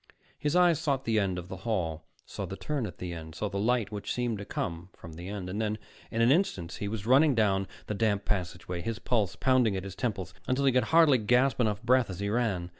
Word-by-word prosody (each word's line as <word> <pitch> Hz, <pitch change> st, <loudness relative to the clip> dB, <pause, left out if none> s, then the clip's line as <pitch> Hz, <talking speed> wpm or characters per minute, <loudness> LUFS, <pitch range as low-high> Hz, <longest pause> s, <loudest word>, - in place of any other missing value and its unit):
His 150 Hz, +2 st, 0 dB
eyes 175 Hz, -4 st, +5 dB
sought 140 Hz, -5 st, -1 dB
the 110 Hz, -1 st, +2 dB
end 95 Hz, -3 st, 0 dB
of 90 Hz, 0 st, -6 dB
the 95 Hz, -, -7 dB
hall, 90 Hz, -6 st, -2 dB, 0.2 s
saw -, -, -5 dB
the -, -, -6 dB
turn 145 Hz, -7 st, -2 dB
at 90 Hz, -, -10 dB
the 90 Hz, -1 st, -5 dB
end, 80 Hz, -1 st, -8 dB
saw 105 Hz, +4 st, -2 dB
the 100 Hz, +1 st, -3 dB
light 115 Hz, 0 st, +1 dB
which 105 Hz, -1 st, -4 dB
seemed 120 Hz, -4 st, -1 dB
to 100 Hz, -, -6 dB
come 85 Hz, -1 st, -4 dB
from 85 Hz, -, -11 dB
the 85 Hz, +3 st, -8 dB
end; 100 Hz, -3 st, -5 dB
and 100 Hz, +4 st, -3 dB
then 105 Hz, 0 st, -1 dB, 0.3 s
in 115 Hz, -, -1 dB
an 120 Hz, -, +5 dB
instant 95 Hz, -, +1 dB
he 100 Hz, -, -4 dB
was 105 Hz, -1 st, -4 dB
running 135 Hz, +4 st, +5 dB
down 100 Hz, -3 st, +2 dB, 0.2 s
the -, -, -3 dB
damp 105 Hz, -1 st, 0 dB
passageway, 90 Hz, -2 st, -3 dB
his 115 Hz, +5 st, -3 dB
pulse 110 Hz, -6 st, 0 dB
pounding 130 Hz, -6 st, +3 dB
at 95 Hz, -, -4 dB
his 100 Hz, -2 st, -7 dB
temples, 95 Hz, -7 st, -3 dB
until 130 Hz, +2 st, +1 dB
he 135 Hz, -, +5 dB
could 125 Hz, -1 st, +2 dB
hardly 160 Hz, -3 st, +5 dB
gasp 125 Hz, +4 st, +3 dB
enough 105 Hz, -4 st, 0 dB
breath 125 Hz, -1 st, +3 dB
as 95 Hz, -1 st, -6 dB
he 100 Hz, 0 st, -1 dB
ran. 105 Hz, -6 st, 0 dB
105 Hz, 245 wpm, -29 LUFS, 95-125 Hz, 0.3 s, eyes